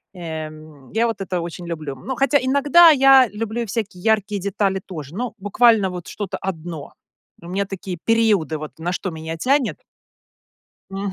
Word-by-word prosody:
Э, 160 Hz, -3 st, -5 dB
м, 155 Hz, -3 st, -14 dB
я 225 Hz, +3 st, +2 dB
вот 220 Hz, -3 st, -4 dB
это 180 Hz, -2 st, -2 dB
очень 170 Hz, +1 st, -7 dB
люблю. 155 Hz, -5 st, -5 dB
Но 260 Hz, -, -5 dB
хотя 275 Hz, +2 st, +3 dB
иногда 285 Hz, +6 st, +6 dB
я 270 Hz, -3 st, +7 dB
люблю 225 Hz, +2 st, -3 dB
и -, -, -2 dB
всякие 200 Hz, -3 st, -4 dB
яркие 210 Hz, -2 st, +1 dB
детали 195 Hz, 0 st, 0 dB
тоже, 155 Hz, -4 st, -8 dB
но 240 Hz, +1 st, -3 dB
буквально 205 Hz, 0 st, +3 dB
вот 180 Hz, -1 st, -7 dB
что-то 205 Hz, -3 st, -5 dB
1. 165 Hz, -5 st, -6 dB, 0.5 s
У 170 Hz, -, -11 dB
меня 195 Hz, +2 st, -1 dB
такие 190 Hz, -1 st, -6 dB
периоды, 215 Hz, -9 st, +2 dB
вот 155 Hz, 0 st, -9 dB
на 175 Hz, +2 st, -2 dB
что 185 Hz, -, -3 dB
меня 160 Hz, 0 st, -6 dB
тянет. 265 Hz, -, +1 dB, 1.1 s
М. 195 Hz, +1 st, -3 dB
195 Hz, 175 wpm, -21 LUFS, 170-230 Hz, 1.1 s, я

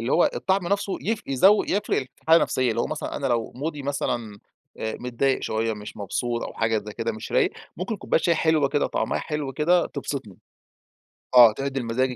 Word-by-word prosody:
اللي 115 Hz, +4 st, -1 dB
هو 175 Hz, -, +4 dB
الطعم 190 Hz, -1 st, 0 dB
نفسه 200 Hz, -1 st, 0 dB
يف 220 Hz, +1 st, -1 dB
يزو 190 Hz, +11 st, +5 dB
يفرق 205 Hz, +2 st, 0 dB
في 130 Hz, 0 st, -18 dB
الحالة 160 Hz, +1 st, +6 dB
النفسية. 130 Hz, -6 st, +2 dB
اللي 115 Hz, -, -1 dB
هو -, -, 0 dB
مثلًا 155 Hz, -, -4 dB
أنا 140 Hz, -, -2 dB
لو 120 Hz, -3 st, -1 dB
مودي 145 Hz, +2 st, -4 dB
مثلًا، 120 Hz, -6 st, -3 dB, 0.4 s
آآ، 110 Hz, 0 st, -3 dB
متضايق 125 Hz, +2 st, 0 dB
شوية، 110 Hz, +1 st, -1 dB
مش 105 Hz, +1 st, -9 dB
مبسوط 115 Hz, +4 st, -2 dB
أو -, -, -9 dB
حاجة 110 Hz, -1 st, +1 dB
زي 105 Hz, 0 st, -8 dB
كده، 115 Hz, +2 st, -2 dB
مش 110 Hz, -, -8 dB
رايق، -, -, +3 dB, 0.3 s
ممكن 195 Hz, +5 st, -3 dB
كوباية 165 Hz, -, 0 dB
شاي 170 Hz, -, +3 dB
حلوة 155 Hz, -3 st, +2 dB
كده 145 Hz, +1 st, +1 dB
طعمها -, -, -1 dB
حلو 150 Hz, -3 st, -4 dB
كده، 170 Hz, +6 st, +2 dB
تبسطني. 130 Hz, -10 st, -6 dB, 1.0 s
آه، 120 Hz, -3 st, +10 dB
تعدل 135 Hz, +1 st, -3 dB
مزاجي 125 Hz, +2 st, 0 dB
135 Hz, 200 wpm, -24 LUFS, 115-160 Hz, 1.0 s, آه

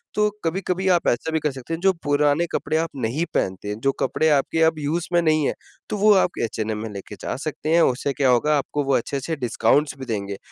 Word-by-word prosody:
तो 210 Hz, 0 st, +3 dB, 0.2 s
कभी-कभी 185 Hz, +2 st, -1 dB
आप 170 Hz, -, -1 dB
ऐसा 120 Hz, +7 st, 0 dB
भी 160 Hz, -, +1 dB
कर 150 Hz, -1 st, -1 dB
सकते 135 Hz, +4 st, -7 dB
हैं, 165 Hz, -, -3 dB
जो 190 Hz, 0 st, +4 dB
पुराने 145 Hz, +2 st, +2 dB
कपड़े 155 Hz, -, -1 dB
आप 165 Hz, +1 st, 0 dB
नहीं 130 Hz, +6 st, -1 dB
पहनते 95 Hz, +2 st, -2 dB
जो 135 Hz, +6 st, 0 dB
कपड़े 160 Hz, -, +1 dB
आपके 150 Hz, +2 st, +1 dB
अब 160 Hz, -1 st, +2 dB
यूज़ 155 Hz, +4 st, -2 dB
में 175 Hz, -, +4 dB
नहीं 155 Hz, -2 st, +2 dB
हैं -, -, +1 dB, 0.4 s
तो 210 Hz, -, -2 dB
वो 210 Hz, +1 st, +5 dB
आप 185 Hz, -2 st, +2 dB
एचएनएम 110 Hz, -1 st, -2 dB
में 115 Hz, -, -5 dB
लेके 100 Hz, +1 st, -8 dB
जा -, -, -3 dB
सकते 155 Hz, 0 st, -4 dB
हैं 170 Hz, -, +5 dB
उससे 135 Hz, 0 st, +1 dB
क्या 135 Hz, 0 st, +2 dB
होगा 145 Hz, +5 st, +3 dB
आपको 145 Hz, +1 st, -2 dB
वो 135 Hz, -1 st, +1 dB
अच्छे-अच्छे 140 Hz, +6 st, -3 dB
डिस्काउंट्स 135 Hz, +2 st, +1 dB
भी 130 Hz, -, -6 dB
देंगे। 100 Hz, -4 st, -3 dB
145 Hz, 230 wpm, -23 LUFS, 125-165 Hz, 0.4 s, वो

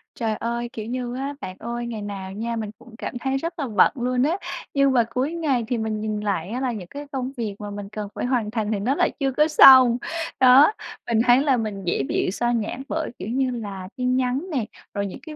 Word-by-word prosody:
Trời 225 Hz, -2 st, -1 dB
ơi, 235 Hz, +2 st, -3 dB
kiểu 220 Hz, -4 st, -5 dB
như 245 Hz, 0 st, -4 dB
á, 275 Hz, +2 st, -3 dB
bạn 185 Hz, -, -6 dB
ơi, 235 Hz, +1 st, -4 dB
ngày 225 Hz, -3 st, -5 dB
nào 195 Hz, -2 st, -6 dB
nha 230 Hz, +3 st, -3 dB
mình 215 Hz, -2 st, -4 dB
cũng 240 Hz, -1 st, -15 dB
cảm -, -, -5 dB
thấy 265 Hz, +2 st, -1 dB
rất 335 Hz, +4 st, -5 dB
là 280 Hz, -, -1 dB
bận 210 Hz, -5 st, +4 dB
luôn 250 Hz, 0 st, 0 dB
á. 320 Hz, +6 st, +1 dB, 0.4 s
Nhưng 275 Hz, -1 st, +4 dB
mà 240 Hz, -, +4 dB
cuối 255 Hz, +7 st, -1 dB
ngày 290 Hz, -8 st, 0 dB
thì 245 Hz, 0 st, -1 dB
mình 220 Hz, -1 st, -2 dB
nhìn 215 Hz, -1 st, -2 dB
lại 200 Hz, -4 st, -2 dB
á, 240 Hz, +4 st, -3 dB
là 260 Hz, -2 st, 0 dB
những 205 Hz, -6 st, -6 dB
cái 285 Hz, +8 st, -8 dB
công 260 Hz, -1 st, -3 dB
việc 215 Hz, -4 st, -3 dB
mà 205 Hz, -1 st, -6 dB
mình 205 Hz, -1 st, -7 dB
cần 210 Hz, 0 st, -5 dB
phải -, -, -2 dB
hoàn 245 Hz, -4 st, 0 dB
thành 220 Hz, -2 st, -1 dB
thì 210 Hz, -, 0 dB
nó 250 Hz, +8 st, 0 dB
lại -, -, +2 dB
chưa 270 Hz, -2 st, +1 dB
có 300 Hz, +4 st, +3 dB
xong. 260 Hz, -5 st, +8 dB, 0.4 s
Đó, 265 Hz, +6 st, +7 dB, 0.4 s
mình 225 Hz, -1 st, +2 dB
thấy 245 Hz, +2 st, +6 dB
là 275 Hz, -3 st, +3 dB
mình 210 Hz, -4 st, -4 dB
dễ 170 Hz, -6 st, 0 dB
bị -, -, 0 dB
xao 240 Hz, +4 st, 0 dB
nhãng 235 Hz, +3 st, -2 dB
bởi, 320 Hz, 0 st, -2 dB
kiểu -, -, -5 dB
như 260 Hz, +2 st, 0 dB
là, 200 Hz, -6 st, -6 dB
tin 250 Hz, 0 st, +1 dB
nhắn 260 Hz, +6 st, 0 dB
nè, 260 Hz, -8 st, 0 dB, 0.3 s
rồi 200 Hz, -1 st, -1 dB
những 190 Hz, -, -8 dB
cái 315 Hz, -2 st, -9 dB
240 Hz, 250 wpm, -23 LUFS, 215-265 Hz, 0.4 s, xong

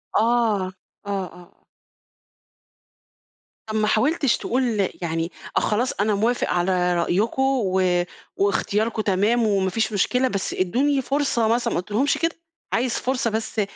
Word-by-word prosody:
آه، 220 Hz, -, +4 dB, 0.8 s
آه 195 Hz, -2 st, -2 dB
آه 170 Hz, -, -13 dB
آه. 175 Hz, -1 st, -17 dB, 2.0 s
طَب 215 Hz, 0 st, -5 dB
ما 215 Hz, 0 st, +2 dB
حاولتش 275 Hz, +4 st, +2 dB
تقول 235 Hz, -6 st, 0 dB
يعني 165 Hz, 0 st, -2 dB, 0.3 s
آه، -, -, +7 dB
خلاص 240 Hz, +5 st, 0 dB
أنا 210 Hz, +1 st, +1 dB
موافق 230 Hz, +4 st, +1 dB
على 180 Hz, 0 st, +1 dB
رأيكم، 200 Hz, +9 st, 0 dB
و 190 Hz, -9 st, +2 dB, 0.3 s
واختياركم 210 Hz, +3 st, 0 dB
تمام 210 Hz, +4 st, +2 dB
وما 195 Hz, -2 st, +1 dB
فيش 220 Hz, +2 st, -1 dB
مشكلة، 250 Hz, +6 st, +2 dB
بس 200 Hz, -5 st, -2 dB
إدّوني 270 Hz, +10 st, +1 dB
فرصة 270 Hz, -4 st, 0 dB
مثلًا، 235 Hz, +2 st, +1 dB
ما -, -, 0 dB
قُلتلهُمش 215 Hz, +10 st, 0 dB
كده، 330 Hz, 0 st, 0 dB, 0.4 s
عايز 245 Hz, 0 st, +1 dB
فرصة 255 Hz, -1 st, -1 dB
بس 220 Hz, 0 st, -2 dB
215 Hz, 135 wpm, -23 LUFS, 190-245 Hz, 2.0 s, آه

